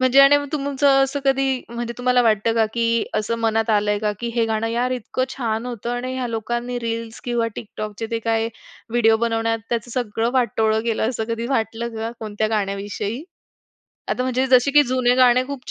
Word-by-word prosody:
म्हणजे 255 +1 +5
आणि 275 +1 +7 0.2
तुमचं 285 -1 +1 0.2
असं 270 +1 -3
कधी 270 -1 +1
म्हणजे 235 0 -4
तुम्हाला 250 0 +3
वाटतं 225 0 +2
का, 225 -1 +3
की 230 -1 +1
असं 215 +2 -1
मनात 225 0 +1
आलंय 210 -1 +2
का, 210 -1 0
की 235 - -2
हे 235 -1 +2
गाणं 220 0 -1
यार 240 +2 0
इतकं 255 +1 -2
छान 230 -2 -2
होतं 240 -1 -5
आणि 250 +1 -3
ह्या 255 -1 -2
लोकांनी 240 +2 -3
रील्स 230 0 -4
किंवा 240 -2 0
TikTokचे 215 0 -6
ते 230 - 0
काही 225 0 0 0.4
व्हिडिओ 225 -2 +4
बनवण्यात 225 0 0
त्याचं 235 0 -2
सगळं 230 -2 -1
वाटोळं 220 -3 +2
केलं 225 -1 0
असं 225 -3 -2
कधी 230 +1 -2
वाटलं 230 -2 -1
का 225 +1 -3
कोणत्या 215 0 -2
गाण्याविषयी? 205 +3 -2 0.9
आता 250 - 0
म्हणजे 255 +1 0
जसे 255 +1 +4
की 295 +1 +6
जुने 250 -1 +2
गाणे 255 0 +5
खूप 275 -2 -7
230 Hz, 185 wpm, -21 LUFS, 225-250 Hz, 0.9 s, आणि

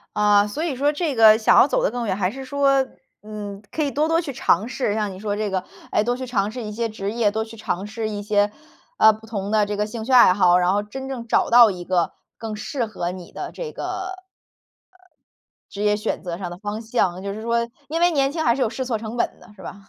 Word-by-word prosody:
呃， 205 0 +4
所 285 +10 -4
以 315 -6 -2
说 285 +3 +2
这 305 -1 -2
个 220 -1 +8
想 220 - +4
要 - - +8
走 - - 0
得 - - +2
更 245 -1 -3
远， 190 -3 -1
还 185 -2 0
是 265 +4 -8
说， 275 0 +2 0.4
嗯， 205 -2 -7
可 310 - -1
以 285 - 0
多 295 +4 +1
多 330 +1 +3
去 295 -5 -5
尝 215 -2 +1
试。 240 -4 -1
像 210 -2 -1
你 185 - -10
说 205 0 -2
这 215 -1 -2
个， 190 -1 -2 0.3
哎， 210 - +2
多 245 +2 0
去 260 - -5
尝 210 -5 -1
试 245 0 -6
一 210 - -5
些 230 +2 -2
职 205 -2 -4
业， 225 -3 +2
多 220 +1 -1
去 225 0 -12
尝 195 -3 -3
试 220 +1 -4
一 205 -1 -4
些， 205 0 +1 0.5
呃， 220 - +7
不 220 +1 -12
同 205 -3 -4
的 215 -1 +3
这 205 0 -3
个 210 - 0
兴 220 0 -6
趣 260 - -3
爱 240 -7 +8
好， 180 -2 +4
然 180 +1 +2
后 205 +1 0
真 265 +5 -7
正 245 -3 -6
找 - - +1
到 235 -1 +8
一 180 -1 -7
个 175 -2 0 0.3
更 225 -1 -5
适 235 +3 -3
合 180 -5 -4
你 180 -1 -9
的 - - -6
这 470 -2 -7
个 - - -7
呃， 370 +1 -4 1.6
职 200 - -6
业 210 0 +3
选 210 - -3
择 175 -2 -5
上 180 -2 -5
的 - - -8
方 210 +1 -5
向。 215 -6 0
就 200 0 -4
是 220 - -7
说 235 0 0 0.2
因 325 +3 -2
为 350 0 +4
年 275 -2 +2
轻 315 +2 -2
还 235 - +4
是 260 - -1
有 220 - +1
试 260 +2 -4
错 240 -3 -1
成 220 +2 -6
本 235 - -2
的， - - -17
是 190 - -13
吧？ - - -7
220 Hz, 285 characters per minute, -22 LUFS, 205-255 Hz, 1.6 s, 个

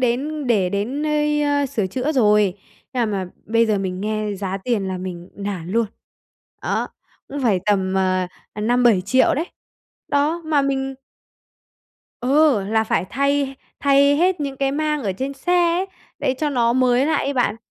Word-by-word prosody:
đến 270 +4 -1
để 205 -6 +2
đến 225 +9 -2
nơi, 300 -1 +1
ơ, 285 -1 +1
sửa 215 -6 -1
chữa 255 +10 -2
rồi, 210 - +3 0.4
nhưng 235 -4 0
mà 195 -2 -2
mà 180 - -12 0.2
bây 230 +2 +3
giờ 215 -2 +1
mình 185 -1 -3
nghe 215 0 -2
giá 195 0 -3
tiền 220 -6 0
là 185 -1 -3
mình 180 -1 -7
nản 195 -4 -5
luôn, 230 +1 +2 0.8
đó, - - -1 0.4
cũng 280 0 -5
phải 205 -7 +2
tầm, 190 -2 +1
ờ, 185 -1 +1 0.3
ờ, 210 - -7
5.000.000-7.000.000 240 -1 +3
đấy. 315 +5 -1 0.6
Đó, 300 +4 +1
mà 300 -3 +2
mình 270 -1 -1 1.3
Ừ, 270 -3 +3
là 220 +2 +1
phải 215 - 0
thay 280 0 0 0.3
thay 280 0 +4
hết 360 +1 +2
những 275 -2 -3
cái 275 0 0
mang 300 0 -1
ở 195 -4 -1
trên 265 +8 -4
xe 280 +6 -2 0.3
ấy, 380 - -1 0.3
để 260 - 0
cho 300 0 0
nó 235 -4 +2
mới 255 +2 +3
lại 320 - +1
ấy 280 - -1
bạn. 245 -3 +1
245 Hz, 175 wpm, -21 LUFS, 205-285 Hz, 1.3 s, thay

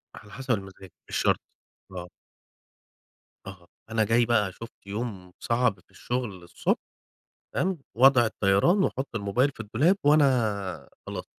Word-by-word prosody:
على 105 - -13
حسب 135 +1 -4
المزاج. 95 -3 -4 0.2
مش - - -4
شرط، - - +2 0.5
آه. 90 -1 -7 1.4
آه، 90 -3 -11 0.2
أنا 110 -1 +2
جاي 115 +3 +3
بقى 105 -5 +2
شُفت 115 +5 -11
يوم 100 -4 -5
صعب 115 -4 +1
في - - -28
الشغل 120 -7 -4
الصبح، 85 - -1 0.8
فاهم، 185 -2 0 0.2
وضع 130 -1 +6
الطيران 110 - +3
وأحط 135 -5 -1
الموبايل 115 +7 +1
في 135 - -23
الدولاب، 130 - +2
وأنا 125 -10 +2 0.2
خلاص - - -5
115 Hz, 130 wpm, -27 LUFS, 100-130 Hz, 1.4 s, وضع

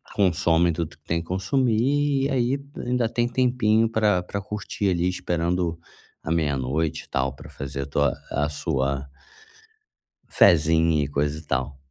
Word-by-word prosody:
consomem 85 -3 +3
tudo 80 -1 -4
o - - -20
que 75 - -44
tem 85 0 -1
que 85 - -13
consumir, 135 +7 +1
e - - 0
aí 130 0 +1 0.3
ainda 125 -1 +1
tem 120 +1 0
tempinho 120 -3 +2
pra 105 -5 +2
pra 100 - -4
curtir 105 0 -3
ali 90 -1 +1
esperando 90 -1 -1 0.4
a - - -5
meia 75 -4 +1
noite 75 +5 -2
e - - -25
tal 65 0 -1
pra - - -12
fazer 70 0 -5
a - - -6
tua 70 0 +1 0.2
a 75 +1 0
sua, 70 -1 -2 1.2
fézinha 80 -3 +4
e - - -2
coisa 70 +1 -1
e - - -13
tal. 65 0 -2
85 Hz, 165 wpm, -24 LUFS, 75-110 Hz, 1.2 s, fézinha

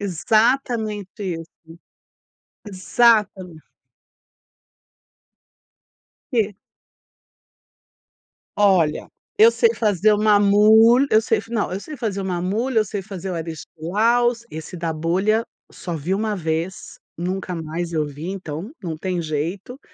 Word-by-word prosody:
Exatamente 215 - 0
isso. 165 -3 -5 1.2
Exatamente. 195 -4 +1 2.6
Eh. 215 -4 +1 2.0
Olha, 185 -7 +2 0.3
eu 440 +2 +7
sei 465 0 +2
fazer 210 -1 +2
o - - +3
maamoul 215 +4 +5
eu 215 - +5
sei - - 0
não, 225 -5 -2
eu 195 - -3
sei 305 +4 -9
fazer 210 -5 -3
o - - -4
maamoul 190 +8 -2
eu 220 -3 +2
sei 200 -1 -5
fazer 190 -2 -7
o - - -3
aristilaus 210 +9 -1
esse 160 +3 -8
da 165 -1 -2
bolha 190 +8 0 0.3
só 170 -3 -6
vi 165 +6 -2
uma 210 +1 -1
vez, 165 +2 -4 0.2
nunca 185 +1 -3
mais 165 +1 -5
eu 155 -2 0
vi. 145 +4 -8
Então, 185 - -6
não 165 -3 -4
tem 180 0 -2
jeito. 170 - -4
195 Hz, 115 wpm, -21 LUFS, 170-220 Hz, 2.6 s, eu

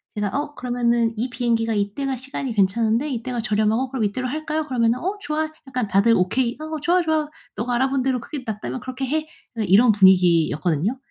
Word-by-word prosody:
제가 210 -1 -1
"어 290 +6 -3
그러면은 240 -2 0
이 245 +3 -1
비행기가 230 -2 0
이때가 215 +7 -1
시간이 260 0 -5
괜찮은데 225 +6 +1
이때가 245 -1 -3
저렴하고 220 +3 +1
그럼 245 -6 0
이때로 255 +6 -2
할까요?" 310 +2 -2
그러면은 235 -2 +1
"어 385 +4 -3
좋아." 310 0 -2 0.2
약간 250 -4 -2
다들 200 +4 +4
"오케이. 235 +7 0
아 - - -5 0.2
좋아, 350 +4 +3
좋아. 315 -2 0 0.3
너가 240 +3 -1
알아본 265 +1 +1
대로 260 -1 0
그게 275 +1 -7
낫다면 220 +3 -4
그렇게 255 +2 -5
해." 310 +3 -1 0.3
그냥 220 -4 -2
이런 220 +6 +6
분위기였거든요. 180 - +3
240 Hz, 450 characters per minute, -22 LUFS, 215-270 Hz, 0.3 s, 이런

